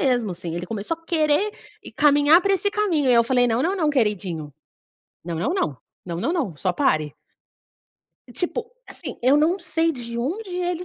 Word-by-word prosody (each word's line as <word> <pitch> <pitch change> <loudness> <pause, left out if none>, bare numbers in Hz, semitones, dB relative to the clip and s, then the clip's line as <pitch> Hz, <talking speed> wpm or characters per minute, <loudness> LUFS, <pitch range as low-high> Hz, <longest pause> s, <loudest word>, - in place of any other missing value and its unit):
mesmo 245 - +1
assim. 170 -1 -6
Ele 175 +1 -4
começou 220 - -3
a 330 - -27
querer 315 +4 +2 0.5
caminhar 295 +3 +5
para 395 - +2
esse 390 +2 +1
caminho, 345 -11 +1
e - - +5
eu 235 0 +5
falei: 245 0 +3
"Não, 235 +2 +1
não, 370 +4 +1
não 310 -4 +1
queridinho, 190 - -1 0.7
não 170 0 -4
não 180 - -1
não, 150 - -1 0.3
não 170 -1 -4
não 285 - 0
não, 255 - -2
só 185 +3 0
pare." 155 - +1 1.1
Tipo, 405 - -4 0.2
assim, 275 -9 -7
eu 265 +3 +5
não 330 +6 +2
sei 330 -2 0
de 235 -4 -6
onde 365 - -3
ele 355 -1 -2
280 Hz, 185 wpm, -23 LUFS, 210-340 Hz, 1.1 s, caminhar